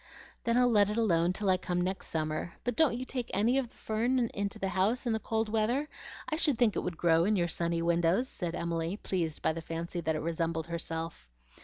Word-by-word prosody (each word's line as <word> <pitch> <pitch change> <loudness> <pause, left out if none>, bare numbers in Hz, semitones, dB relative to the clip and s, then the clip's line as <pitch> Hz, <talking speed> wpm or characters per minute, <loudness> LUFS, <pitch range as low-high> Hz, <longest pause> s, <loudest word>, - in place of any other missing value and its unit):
"Then 235 +1 +2
I'll 250 0 +5
let 205 -2 +5
it 210 - -2
alone 175 -6 +3
till 200 +2 -2
I 185 -1 +4
come 180 -1 -2
next 185 +2 -2
summer. 155 +1 -2
But 245 -1 -1
don't 275 -4 +3
you 255 - -4
take 250 -2 -4
any 235 +6 +3
of 250 -3 -3
the - - -25
fern 230 +4 0 0.2
into 200 0 -3
the 195 - -2
house 195 +8 +1
in 235 - +1
the 220 - 0
cold 220 0 -1
weather? 225 +7 +1 0.4
I 310 - -1
should 300 -6 +2
think 225 -4 +3
it - - 0
would 175 -2 -4
grow 165 -1 +4
in 210 +4 +2
your 175 -3 +2
sunny 170 0 -1
windows," 170 +7 +2
said 175 -8 -4
Emily, 170 +2 -2
pleased 170 -7 -2
by - - +2
the 165 - -5
fancy 165 +2 -4
that 160 -1 0
it 155 - -2
resembled 165 0 -1
herself. 165 - -4
185 Hz, 230 wpm, -31 LUFS, 165-225 Hz, 0.4 s, I'll